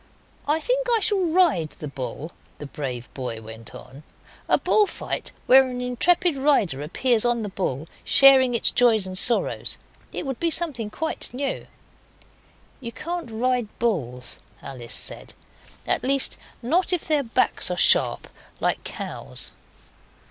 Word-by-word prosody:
'I 300 +2 +2
think - - -1
I 465 -2 +3
shall 410 -1 +1
ride 330 - +2
the 150 - -7
bull,' 140 +3 -5 0.3
the 150 - -8
brave 130 -4 -6
boy 125 -4 -5
went 110 +2 -10
on. 130 +2 -12 0.5
'A - - +5
bull 425 -1 +3
fight, - - -4
where 265 +1 +6
an 250 0 -5
intrepid 325 +7 +2
rider 225 - +1
appears 220 - 0
on 240 -2 +1
the 205 - -4
bull, 160 -6 -3 0.2
sharing 265 -3 +6
its 230 - +3
joys 230 -5 +3
and 185 0 -6
sorrows. 235 +5 +2 0.3
It - - -4
would 265 -3 -4
be 340 - +1
something 295 -10 +1
quite 320 +8 -2
new.' 275 +1 -3 1.1
'You 235 -3 -6
can't 340 +3 -5
ride 245 +1 -1
bulls,' 125 - -2 0.2
Alice 120 -3 -9
said; - - -6 0.5
'at - - +1
least, 275 +1 +1 0.3
not 345 +10 +1
if 355 -3 -1
their 305 -2 +2
backs 235 -4 +1
are - - -3
sharp - - +4 0.3
like - - -1
cows. - - -7
240 Hz, 150 wpm, -23 LUFS, -, 1.1 s, where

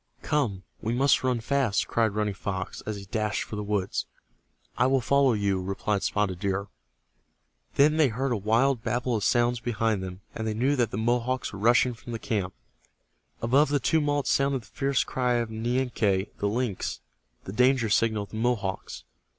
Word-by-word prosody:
"Come, 115 -11 0 0.2
we 115 - -1
must 135 +2 +3
ran 125 -2 +1
fast!" 130 -4 +1
cried 110 -3 +1
Running 105 -1 0
Fox, 95 -1 -4
as 110 - -2
he 100 -1 -8
dashed 105 +1 -1
for - - -7
the 105 - -3
woods. 100 -2 -2 0.7
"I - - +3
will 135 0 +3
follow 135 +1 +3
you," 100 -3 0
replied 100 +2 -1
Spotted 95 -4 0
Deer. 100 0 -2 1.1
Then 150 +2 +4
they 155 -3 +5
heard 130 +3 -2
a - - +2
wild 115 +5 +2
babel 120 +1 0
of 105 - -1
sounds 120 +2 +2
behind 115 -3 0
them, 95 0 -7
and 110 -1 -4
they 110 - -1
knew 130 +6 +2
that 120 -4 +1
the - - -5
Mohawks 120 +3 0
were 95 - -7
rushing 120 +3 +4
from 120 +1 -9
the - - -2
camp. 100 -5 -2 0.9
Above 135 +6 +4
the 145 0 +2
tumult 145 -1 +1
sounded 135 -3 +1
the - - -21
fierce 135 -1 +1
cry 125 -1 0
of 120 -2 -1
Nianque, 110 -4 0
the 100 - -1
lynx, 115 -3 -2 0.4
the 95 - -7
danger 125 0 +3
signal 110 0 +2
of 100 - -12
the 110 - -6
Mohawks. 110 -5 -2
115 Hz, 185 wpm, -27 LUFS, 105-130 Hz, 1.1 s, they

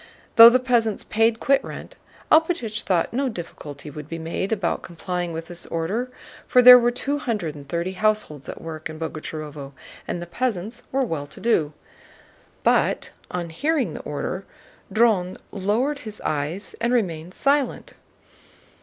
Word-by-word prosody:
Though 230 0 +12
the 245 - +4
peasants 240 -4 +1
paid 225 +1 +2
quitrent, 275 0 0 0.4
Alpátych 315 -10 +3
thought 180 0 0
no 265 +2 0
difficulty 150 - -8
would 150 +1 -9
be 165 - -4
made 165 +5 -3
about 195 -6 0
complying 175 0 -4
with 165 0 -5
this 175 0 -6
order, 195 +10 -2 0.4
for 250 - +5
there 250 0 +12
were 240 0 +3
two 280 +4 -2
hundred 210 - -2
and 140 -2 -12
thirty 170 +3 -1
households 200 -8 -1
at - - -7
work 160 -1 -6
in 155 - -8
Boguchárovo 155 -3 -6 0.3
and - - -3
the 175 - -5
peasants 210 +2 -3
were 270 0 +1
well 150 -9 -4
to - - -13
do. 160 -10 +1 0.9
But - - +2 0.2
on 175 -2 -4
hearing 275 - 0
the - - -6
order 180 +6 -4 0.5
Dron 200 -4 +2
lowered 225 +9 0
his 215 -6 -8
eyes 155 +6 -3
and 235 +1 +1
remained 180 -7 -1
silent. 285 - 0
190 Hz, 155 wpm, -23 LUFS, 165-240 Hz, 0.9 s, Though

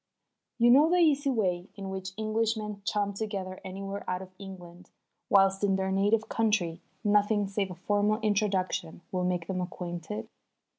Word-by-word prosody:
You 240 0 +6
know 290 +5 +7
the 355 - +3
easy 295 -4 +4
way 185 -7 0
in 195 -1 -6
which 190 0 -5
Englishmen 215 -1 -1
chum 205 -1 0
together 195 -3 -4
anywhere 195 +1 -5
out 185 +1 -2
of 185 - -13
England, 180 -3 -10 0.4
whilst 195 0 +4
in 195 -1 +3
their 190 0 -1
native 205 +3 +2
country 210 -7 0 0.2
nothing 205 0 +3
save 195 0 -1
a 180 - -7
formal 205 +4 +1
introduction 195 -5 0
will 185 -1 -1
make 180 -2 0
them 185 0 -2
acquainted? 175 - -5
195 Hz, 155 wpm, -29 LUFS, 185-215 Hz, 0.4 s, know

